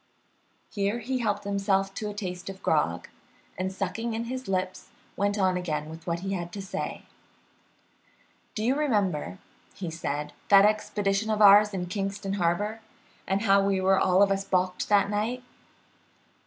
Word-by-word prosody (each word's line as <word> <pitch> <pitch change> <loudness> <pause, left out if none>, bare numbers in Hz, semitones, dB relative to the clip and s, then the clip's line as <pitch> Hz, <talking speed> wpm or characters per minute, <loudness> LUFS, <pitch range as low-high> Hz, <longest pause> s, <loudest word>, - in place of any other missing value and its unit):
Here 200 +2 -1
he 255 +3 -2
helped 205 -3 -1
himself 195 -1 0
to 210 +1 -4
a - - -6
taste 180 -3 -5
of 190 0 -9
grog, - - +1 0.5
and 190 0 -2
sucking 200 +5 -3
in 225 - -2
his 255 +2 -5
lips, 185 -1 -2 0.3
went 200 +1 0
on 185 -2 +2
again 155 -3 -3
with 160 +1 -11
what 170 0 -1
he 195 +1 -3
had 175 -2 -4
to 205 - -6
say. 195 0 -5 1.5
"Do 215 - -2
you 245 +4 +3
remember," 200 - 0 0.4
said 150 -4 -4
he, - - -28
"that 200 0 +8
expedition 210 0 0
of 215 -1 0
ours 210 0 +7
in 185 -3 -3
Kingston 195 +1 -3
Harbor, 200 +4 0 0.5
and 195 +2 0
how 200 -2 +4
we 195 -1 +1
were 190 0 +3
all 185 +2 +4
of 200 - +2
us 195 0 0
balked 185 -1 -1
that 200 -1 +4
night?" 220 +5 -2
195 Hz, 165 wpm, -27 LUFS, 185-210 Hz, 1.5 s, that